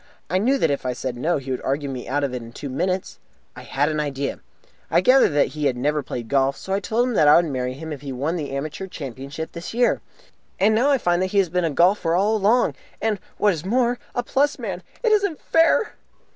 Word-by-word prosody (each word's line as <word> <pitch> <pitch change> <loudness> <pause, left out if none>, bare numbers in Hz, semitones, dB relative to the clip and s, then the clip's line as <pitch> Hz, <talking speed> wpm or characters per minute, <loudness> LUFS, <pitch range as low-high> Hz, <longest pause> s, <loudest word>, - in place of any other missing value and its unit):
I 185 - +2
knew 260 +7 +2
that 165 - +2
if 140 - -2
I 125 -1 -1
said 130 0 -4
'No', 155 +8 0
he 135 -1 -6
would 130 - -2
argue 140 +2 -1
me 130 -2 -6
out 145 +2 0
of 135 -2 -1
it 125 - -4
in 115 0 -11
two 140 - -6
minutes. 180 +7 -2 0.4
I - - -9
had 145 +2 0
an 155 0 -1
idea. 140 -2 -3 0.5
I - - +4
gathered 255 +8 +5
that 145 - +3
he 150 -1 -4
had 125 - -1
never 150 +4 0
played 120 -3 -6
golf, 135 +1 +1
so 190 - -5
I 195 - +2
told 230 +5 0
him 250 - -1
that 155 -8 +4
I 150 - +8
would 175 - +5
marry 130 -4 -2
him 160 +2 -6
if 140 - -8
he 140 -2 -6
won 140 +7 -2
the 150 -5 -3
Amateur 150 +7 -4
Championship 140 0 -7
this 170 +6 -7
year. 245 0 +2 0.6
And 210 +3 +4
now 245 +6 +3
I 280 - +4
find 175 -6 +1
that 185 - +1
he 200 - -2
has 195 -3 +3
been 180 +1 0
a - - +1
golfer 170 +2 +3
all 205 +4 +2
along, 220 +4 +3 0.3
and, 215 -2 0 0.2
what 205 -1 +3
is 160 -2 -6
more, 240 +4 +1 0.2
a 245 - 0
plus 285 +4 +1
man! 195 -8 -5 0.2
It 460 - +3
isn't 400 -6 +2
fair!" 330 +6 +3
165 Hz, 250 wpm, -23 LUFS, 140-215 Hz, 0.6 s, I